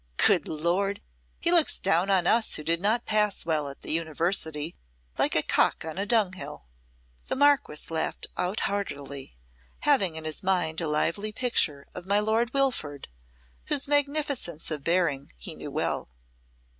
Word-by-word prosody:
Good - - +4
Lord! 180 +6 0 0.4
he 340 - +1
looks 340 -3 +4
down 175 +4 +2
on 190 -3 +3
us 225 +4 +2
who 150 - -2
did 165 +2 0
not 220 +4 +1
pass 210 -4 +1
well 155 -3 0
at 140 - -11
the - - -2
University, 160 0 0 0.4
like - - +2
a - - +5
cock - - +2
on 160 +3 -5
a 200 - -1
dunghill." 185 - 0 0.6
The - - -1
Marquess 280 - +2
laughed 160 -1 -2
out 180 +3 -1
heartily, 140 - -4 0.4
having 200 - +3
in 160 - -4
his 155 +3 -2
mind 180 -4 +1
a 165 - -1
lively 170 +8 0
picture 180 - 0
of 180 0 -7
my 200 +1 +3
Lord 220 +3 +1
Wilford, 245 - -1 0.6
whose 285 -2 -1
magnificence 285 - 0
of 150 -3 -3
bearing 165 -5 0
he - - -5
knew - - -8
well. - - -2
180 Hz, 155 wpm, -27 LUFS, 155-220 Hz, 0.6 s, a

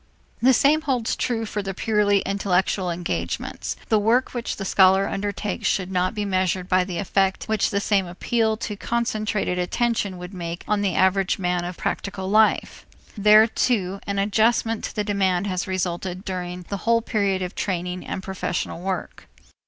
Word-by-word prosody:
The 255 +3 +6
same 285 +5 +4
holds 255 -7 0
true 230 -2 -1
for 210 -1 -3
the 195 -1 -5
purely 205 -2 +2
intellectual 190 -1 0
engagements. 90 - -3
The 220 - +4
work 230 +5 +2
which 240 -2 -3
the 195 - -5
scholar 190 +1 +4
undertakes 205 0 -3
should 185 -1 0
not 185 +3 0
be 210 -1 -2
measured 185 -1 0
by 185 -1 +3
the 180 -2 -5
effect 195 0 +1
which 220 -2 +1
the 200 - 0
same 200 -2 +1
appeal 220 +5 0
to 215 -2 -4
concentrated 215 -4 -1
attention 205 0 0
would 180 +2 -8
make 170 -1 -5
on 210 -1 +1
the 195 -3 0
average 190 0 +2
man 180 -2 -1
of 175 0 -5
practical 190 -1 -3
life. 215 +2 +2 0.3
There, 215 +1 +7
too, 200 -4 0
an 200 0 -2
adjustment 220 +2 +2
to - - -7
the 210 - 0
demand 195 -3 +1
has 185 -2 -2
resulted 185 0 -3
during 180 -1 -4
the 200 - -2
whole 230 +3 +2
period 200 -5 0
of 180 - -5
training 180 -1 -3
and 190 - -4
professional 185 -3 -3
work. 190 0 -4
195 Hz, 170 wpm, -23 LUFS, 185-215 Hz, 0.3 s, There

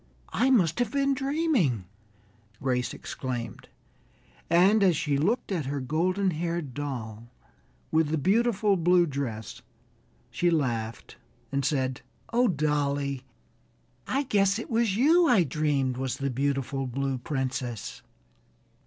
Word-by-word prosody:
"I 260 - +2
must 195 -8 +3
have 245 -3 +1
been 275 0 +2
dreaming," 270 - 0 0.7
Grace 125 -2 -1
exclaimed, 125 -3 -6 0.8
and 190 +6 +5
as 180 -5 +4
she 150 -2 0
looked 200 - 0
at 160 -8 -1
her 140 +1 -2
golden 180 +8 0
haired 165 -3 -3
doll, 120 -6 -5 0.6
with 160 -1 +3
the 160 - 0
beautiful 210 - +2
blue 175 +1 +4
dress, 130 - -5 0.7
she 175 +9 +1
laughed 120 -8 -2 0.3
and 140 0 0
said: 130 -2 -1 0.3
"Oh, 245 +1 +4
dolly, 145 - 0 0.9
I 275 +2 0
guess 200 -6 +2
it 230 - -7
was 225 -3 +1
you 330 +7 +5
I 230 -8 +5
dreamed 140 -3 0
was 130 -1 -2
the 140 -1 -2
beautiful 135 0 -1
Blue 135 +1 -2
Princess!" 130 -4 -4
150 Hz, 125 wpm, -27 LUFS, 130-195 Hz, 0.9 s, and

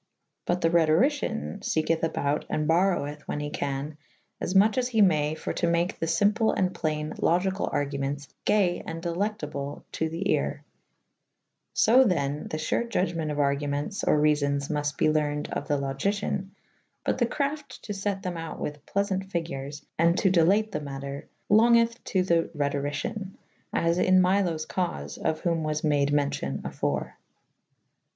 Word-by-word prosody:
But 175 0 +1
the 165 - +3
Rhetoricyan 160 - +2
ieketh 160 +1 0
abought 150 -2 0
and 150 0 -1
boroweth 160 -4 +1
when - - -2
he 145 0 -4
can 145 +2 -3 0.4
afmuche 200 +6 +3
as 250 - 0
he 230 -3 -1
may 155 -4 +2
for - - -4
to - - 0
make 170 +2 0
the 165 - -1
fymple 210 +7 +2
and 185 -1 +1
playne 155 -1 -2
Logycall 185 +3 +1
argumentes 140 0 -2 0.2
gay 190 -4 +2
and 165 0 -4
delectable 170 -6 -3
to 160 - -1
the 165 +4 -4
aere.^ - - -2 1.1
fo 250 +4 +6
then 145 - 0
the 155 - -3
fure 155 +8 0
Judgement 170 -7 -1
of 150 - -3
argu 140 0 +1
mentes 145 +9 -3
or - - +3
reafons 145 -2 +1
mufte 145 -1 -1
be - - +2
lernyd 150 -1 0
of 145 - -3
the 145 - +1
Logicyan 190 +8 -1 0.6
but - - 0
the 240 - +3
crafte 290 +3 -3
to 210 - -5
fet 195 0 -2
them 180 -3 -3
out 165 0 -6
with 145 -1 -5
plefaunte 195 -1 -1
fygures 145 -5 -4
and 170 +2 +4
to 190 - +3
delate 195 +5 +3
the 150 - -3
matter 140 0 -6 0.2
longith' 230 +2 +4
to 185 -2 +1
the 170 -2 +2
Rhetorycian 145 +7 -2 0.2
/ - - -39
as 170 +1 +1
in 185 0 +5
Myloes 180 -4 +2
caufe 75 - -3
of* 155 0 -1
whom 170 -2 0
was 155 0 -2
made 145 -2 +2
mewcyon 140 - -1
afore. - - -2
165 Hz, 160 wpm, -27 LUFS, 145-190 Hz, 1.1 s, fo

